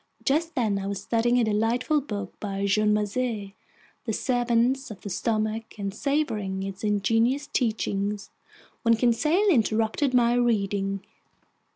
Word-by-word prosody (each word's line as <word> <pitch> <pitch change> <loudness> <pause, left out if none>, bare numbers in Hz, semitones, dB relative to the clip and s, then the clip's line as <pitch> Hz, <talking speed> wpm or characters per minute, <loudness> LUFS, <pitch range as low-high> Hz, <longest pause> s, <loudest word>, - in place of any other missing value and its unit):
Just 320 +4 +1
then 215 -5 +1
I 195 - -4
was 200 -1 -3
studying 235 +4 +1
a 245 - +3
delightful 230 +7 +1
book 205 -8 -5
by 200 -1 -3
Jean 210 +2 +3
Macé, 210 -1 -1 0.5
The 225 - -1
Servants 245 +2 +1
of 200 -4 -9
the 200 - -6
Stomach, 220 +2 -2
and 200 -1 -3
savoring 215 -8 -1
its 195 +1 -6
ingenious 225 +6 +1
teachings, 210 -6 -1 0.5
when 230 -1 +4
Conseil 300 - +2
interrupted 225 - +2
my 240 -1 +4
reading. 200 -5 0
225 Hz, 135 wpm, -26 LUFS, 205-245 Hz, 0.5 s, when